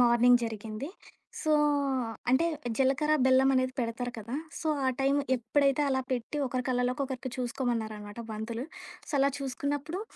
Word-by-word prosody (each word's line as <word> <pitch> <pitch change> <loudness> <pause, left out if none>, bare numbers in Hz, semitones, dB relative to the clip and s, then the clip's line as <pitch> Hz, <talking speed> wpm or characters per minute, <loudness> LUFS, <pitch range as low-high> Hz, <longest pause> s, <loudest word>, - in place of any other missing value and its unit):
Morning 245 0 +6
జరిగింది. 220 +3 -5 0.5
So, 310 - +2 0.8
అంటే, 260 +6 +4 0.3
జీలకర్ర 275 +3 +2
బెల్లం 265 +1 +5
అనేది 255 0 +2
పెడతారు 240 +1 -2
కదా! 225 +3 -6 0.3
సో, 320 - -1 0.2
ఆ - - +4
టైం 270 +1 +3 0.2
ఎప్పుడైతే 275 +4 +2
అలా 265 -1 +1
పెట్టి 255 +4 -2
ఒకరి 255 0 -2
కళ్ళలోకి 250 +1 +1
ఒకరికి 260 -1 -5
చూసుకోమన్నారనమాట 230 -4 -3
పంతులు. 225 +3 -4 0.4
సో, - - -7
అలా 275 +1 +4
చూసుకున్నప్పుడు, 285 +5 -3
255 Hz, 135 wpm, -30 LUFS, 235-275 Hz, 0.8 s, Morning